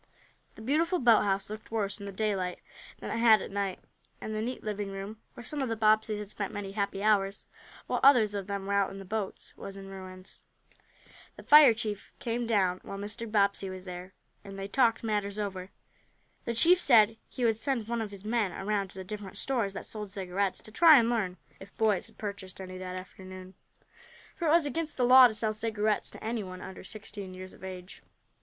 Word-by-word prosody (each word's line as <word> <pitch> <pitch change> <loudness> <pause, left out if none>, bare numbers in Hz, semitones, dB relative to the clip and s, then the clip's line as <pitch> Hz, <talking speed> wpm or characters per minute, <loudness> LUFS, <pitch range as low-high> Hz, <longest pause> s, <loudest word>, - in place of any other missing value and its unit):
The 220 - -11
beautiful 325 +8 +1
boathouse 210 - +3
looked 215 +1 -8
worse 210 -2 -2
in 200 - -7
the - - -5
daylight 190 -3 -1 0.4
than - - -6
it 230 - -2
had 225 -2 +7
at - - -7
night, 200 -2 -2 0.4
and 215 - -5
the 215 - -2
neat 250 +3 -4
living 210 -2 -3
room, 195 +3 -7
where - - -9
some 295 +3 -4
of 265 - -1
the 225 - -1
Bobbseys 215 0 +3
had 210 -1 -7
spent 200 - -4
many 205 -1 -5
happy 200 -1 -2
hours, 200 -2 +1 0.4
while - - -1
others 240 -7 +6
of 200 -1 -4
them 200 -1 -4
were 200 - -2
out 200 -1 +2
in 195 - -9
the 195 - -9
boats, 210 0 -5
was 195 0 -9
in 195 0 -9
ruins. 185 -1 -10 0.9
The - - -12
fire 295 -6 +8
chief 215 -2 -5
came 235 0 -2
down 190 -5 +2
while 195 - -7
Mr. 210 +3 -5
Bobbsey 200 -2 +2
was 185 0 -8
there, 180 +1 -8 0.3
and 195 -1 -9
they 195 0 -4
talked 230 0 +2
matters 205 -2 -1
over. 190 -3 -4 0.8
The 235 - -2
chief 355 +9 +5
said 225 -6 +5
he 250 - -2
would 225 -1 +2
send 245 -4 -1
one 235 0 -1
of 215 - -4
his 200 0 -10
men 220 -3 0
around 200 +1 -1
to 190 - -14
the 190 - -5
different 200 0 -7
stores 235 -8 -1
that - - -6
sold 210 -2 -5
cigarettes, 190 0 -2
to 215 - -11
try 315 +5 +8
and 235 -1 +3
learn 195 -6 -1 0.2
if 195 +1 -14
boys 215 -4 +2
had - - -15
purchased 200 -3 -6
any 185 -1 -7
that 185 0 -6
afternoon, 185 0 -10 0.8
for 340 - -2
it - - +4
was 330 -1 +5
against 310 +2 -2
the 250 - +2
law 255 +1 +9
to 225 - -5
sell 215 0 +1
cigarettes 215 -1 0
to - - -11
anyone 210 -5 -4
under 190 0 -9
sixteen 200 -2 -8
years 185 0 -9
of - - -17
age. 185 0 -9
205 Hz, 210 wpm, -29 LUFS, 195-225 Hz, 0.9 s, law